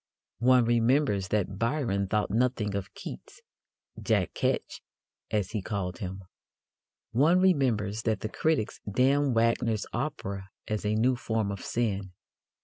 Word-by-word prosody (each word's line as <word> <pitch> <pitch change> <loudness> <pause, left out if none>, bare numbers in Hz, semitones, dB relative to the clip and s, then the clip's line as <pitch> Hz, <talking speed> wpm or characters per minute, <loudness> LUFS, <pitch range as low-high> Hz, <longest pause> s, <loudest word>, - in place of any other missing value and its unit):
One 125 0 +5
remembers 120 -3 +2
that 100 -1 -1
Byron 115 -6 0
thought 105 0 0
nothing 115 -2 +1
of 100 -1 -4
Keats - - -9 0.6
"Jack - - +1
Ketch," - - -1 0.5
as 105 -4 -1
he 110 -3 -2
called 95 -3 -3
him. 95 0 -5 0.9
One 155 +9 +4
remembers 120 - +2
that 110 -3 -1
the 110 - -3
critics 155 -4 0
damned 135 +3 +3
Wagner's 115 -1 +2
operas 110 -8 -3 0.2
as 110 -1 -2
a 105 - +1
new 125 +4 +3
form 110 -4 -1
of 100 - -6
sin. 100 -5 -2
110 Hz, 135 wpm, -28 LUFS, 100-125 Hz, 0.9 s, One